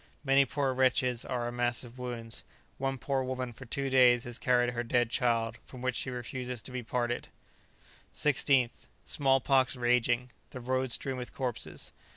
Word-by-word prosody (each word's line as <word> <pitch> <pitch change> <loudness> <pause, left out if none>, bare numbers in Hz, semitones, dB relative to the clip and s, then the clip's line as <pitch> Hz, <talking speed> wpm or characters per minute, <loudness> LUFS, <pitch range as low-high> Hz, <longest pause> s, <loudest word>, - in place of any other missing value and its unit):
Many 135 0 +5
poor 135 0 -1
wretches 125 -2 +2
are 120 -2 -2
a - - -3
mass 120 0 0
of 125 +1 -12
wounds. 120 -2 -4 0.4
One 135 0 -1
poor 135 +2 -1
woman 130 -1 -3
for 130 - -11
two 135 +3 -1
days 125 -2 +6
has 120 0 -4
carried 125 -1 +2
her 120 - -1
dead 120 0 +1
child, 115 -3 +1
from 125 -1 -11
which 130 0 +1
she - - -2
refuses 125 -1 -4
to - - -8
be 125 0 -3
parted. 120 +1 -2 0.9
16th. 135 -4 +2 0.2
Small 135 -2 +3
pox 135 +1 +2
raging; 120 0 +1 0.2
the 130 - -8
road 130 +1 0
strewn 135 +2 0
with 125 -1 -7
corpses. 125 -4 -3
125 Hz, 175 wpm, -30 LUFS, 120-130 Hz, 0.9 s, days